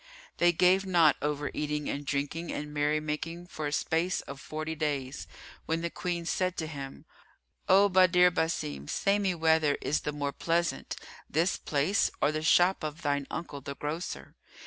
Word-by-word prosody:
They 175 Hz, 0 st, +5 dB
gave 180 Hz, +3 st, +4 dB
not 175 Hz, -5 st, +4 dB
over 145 Hz, 0 st, -2 dB
eating 150 Hz, 0 st, -2 dB
and 145 Hz, -, -3 dB
drinking 145 Hz, +4 st, -2 dB
and 150 Hz, 0 st, -5 dB
merry 150 Hz, +1 st, +1 dB
making 160 Hz, +3 st, -4 dB
for 155 Hz, -4 st, -5 dB
a -, -, -3 dB
space 165 Hz, +3 st, 0 dB
of 140 Hz, 0 st, -9 dB
forty 155 Hz, +1 st, -4 dB
days, 145 Hz, -4 st, -3 dB, 0.4 s
when 165 Hz, +1 st, 0 dB
the 170 Hz, 0 st, -2 dB
Queen 175 Hz, -2 st, -3 dB
said 185 Hz, +1 st, -1 dB
to 160 Hz, -, -2 dB
him, 140 Hz, -3 st, -8 dB, 0.6 s
"O 195 Hz, +2 st, +7 dB
Badr 180 Hz, -1 st, +5 dB
Basim, 75 Hz, -, -2 dB
say 200 Hz, +1 st, +2 dB
me 190 Hz, -3 st, 0 dB
whether 160 Hz, -3 st, +3 dB
is 150 Hz, -, 0 dB
the 150 Hz, -, -3 dB
more 145 Hz, -1 st, -2 dB
pleasant, 170 Hz, 0 st, -1 dB, 0.3 s
this 165 Hz, +5 st, +1 dB
place 155 Hz, +7 st, +1 dB
or 150 Hz, -, +3 dB
the 155 Hz, 0 st, -2 dB
shop 175 Hz, +3 st, +4 dB
of 155 Hz, +2 st, -5 dB
thine 145 Hz, -2 st, 0 dB
uncle 145 Hz, -4 st, -5 dB
the 140 Hz, +1 st, -6 dB
grocer?" 155 Hz, +5 st, -5 dB
155 Hz, 170 wpm, -29 LUFS, 145-175 Hz, 0.6 s, O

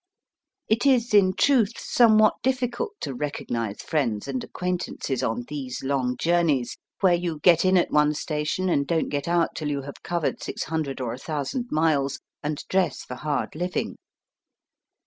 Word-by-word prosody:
It 220 Hz, +2 st, +2 dB
is, 240 Hz, -4 st, +3 dB
in 190 Hz, -3 st, +5 dB
truth, 235 Hz, -6 st, +3 dB
somewhat 215 Hz, -3 st, +5 dB
difl&cult 260 Hz, -, -1 dB
to -, -, -3 dB
re 145 Hz, +4 st, -2 dB
cognize 115 Hz, -6 st, -4 dB
friends 120 Hz, -8 st, -1 dB
and 130 Hz, -2 st, -3 dB
acquaintances 180 Hz, -7 st, -3 dB
on 115 Hz, +2 st, -1 dB
these 135 Hz, -4 st, -5 dB
long 130 Hz, -2 st, 0 dB
journeys, 160 Hz, -8 st, +1 dB, 0.3 s
where 185 Hz, -3 st, +5 dB
you 170 Hz, -3 st, -1 dB
get 170 Hz, -3 st, +6 dB
in 185 Hz, 0 st, +4 dB
at 175 Hz, -, +2 dB
one 150 Hz, 0 st, +3 dB
station 155 Hz, +5 st, -2 dB
and 140 Hz, -5 st, +1 dB
don't 165 Hz, -2 st, 0 dB
get 145 Hz, +1 st, -2 dB
out 170 Hz, -1 st, +2 dB
till 150 Hz, -2 st, -3 dB
you 140 Hz, -2 st, -2 dB
have 140 Hz, +1 st, -9 dB
covered 170 Hz, -3 st, -2 dB
six -, -, -4 dB
hundred 155 Hz, -5 st, -3 dB
or 120 Hz, -2 st, -2 dB
a 125 Hz, -, -8 dB
thousand 155 Hz, -, -3 dB
miles, 150 Hz, -3 st, +1 dB, 0.2 s
and 150 Hz, 0 st, -3 dB
dress 190 Hz, -1 st, 0 dB
for -, -, -8 dB
hard 145 Hz, +3 st, -2 dB
living. 180 Hz, +3 st, -3 dB
155 Hz, 165 wpm, -25 LUFS, 140-185 Hz, 0.3 s, get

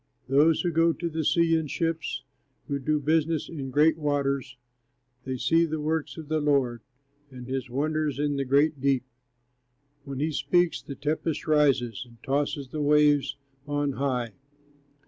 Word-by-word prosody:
Taylor] 140 Hz, +3 st, +5 dB
Those 165 Hz, -1 st, +3 dB
who 175 Hz, -, 0 dB
go 165 Hz, +1 st, +3 dB
to 170 Hz, +1 st, -4 dB
the 160 Hz, 0 st, -2 dB
sea 165 Hz, +2 st, +3 dB
in 160 Hz, -1 st, 0 dB
ships, 165 Hz, +2 st, -2 dB, 0.4 s
Who 140 Hz, -1 st, -2 dB
do 150 Hz, +3 st, 0 dB
business 155 Hz, +2 st, +1 dB
in 140 Hz, -5 st, -5 dB
great 150 Hz, +4 st, +3 dB
waters, 140 Hz, -4 st, -1 dB, 0.7 s
They 130 Hz, -1 st, -3 dB
see 165 Hz, +7 st, +3 dB
the 155 Hz, -1 st, -2 dB
works 155 Hz, +1 st, -2 dB
of 160 Hz, -2 st, -8 dB
the 155 Hz, +1 st, 0 dB
Lord, 135 Hz, -5 st, +1 dB, 0.5 s
And 125 Hz, -2 st, -10 dB
his 130 Hz, 0 st, -4 dB
wonders 150 Hz, +2 st, -1 dB
in 145 Hz, 0 st, 0 dB
the 140 Hz, -, 0 dB
great 140 Hz, +2 st, +2 dB
deep. 135 Hz, -2 st, +2 dB, 1.0 s
When 135 Hz, -1 st, -6 dB
he 155 Hz, +2 st, 0 dB
speaks, 165 Hz, +4 st, +1 dB
the 140 Hz, -, -8 dB
tempest 155 Hz, +2 st, -2 dB
rises, 135 Hz, -8 st, +2 dB
And 115 Hz, -1 st, -18 dB
tosses 140 Hz, 0 st, -1 dB
the 155 Hz, -, -4 dB
waves 145 Hz, -2 st, +3 dB, 0.3 s
on 145 Hz, -1 st, 0 dB
high. 125 Hz, -4 st, -2 dB
145 Hz, 165 wpm, -27 LUFS, 135-155 Hz, 1.0 s, Taylor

